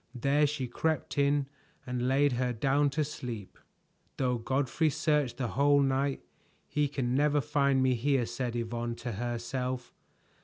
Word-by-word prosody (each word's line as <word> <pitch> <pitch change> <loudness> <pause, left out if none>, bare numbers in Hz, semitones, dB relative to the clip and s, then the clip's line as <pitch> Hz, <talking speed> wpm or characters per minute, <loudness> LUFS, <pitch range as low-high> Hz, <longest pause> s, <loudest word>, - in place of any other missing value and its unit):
There 140 +4 +3
she 140 -3 -3
crept 160 +5 -1
in 140 0 +3 0.4
and 125 0 -2
laid 140 +2 +3
her 125 0 0
down 140 +5 +2
to 150 +3 0
sleep. 120 -8 -7 0.6
"Though 125 -2 0
Godfrey 135 +6 +1
search 150 -3 +1
the 130 -4 -2
whole 140 +4 +4
night, 135 0 +1 0.5
he 150 -1 +1
can 130 -3 -2
never 145 +2 +3
find 140 -1 +2
me 130 -1 +3
here," 130 +1 +1
said 120 0 -3
Yvonne 120 0 -3
to 120 0 -5
herself. 120 +3 -3
130 Hz, 150 wpm, -30 LUFS, 120-145 Hz, 0.6 s, whole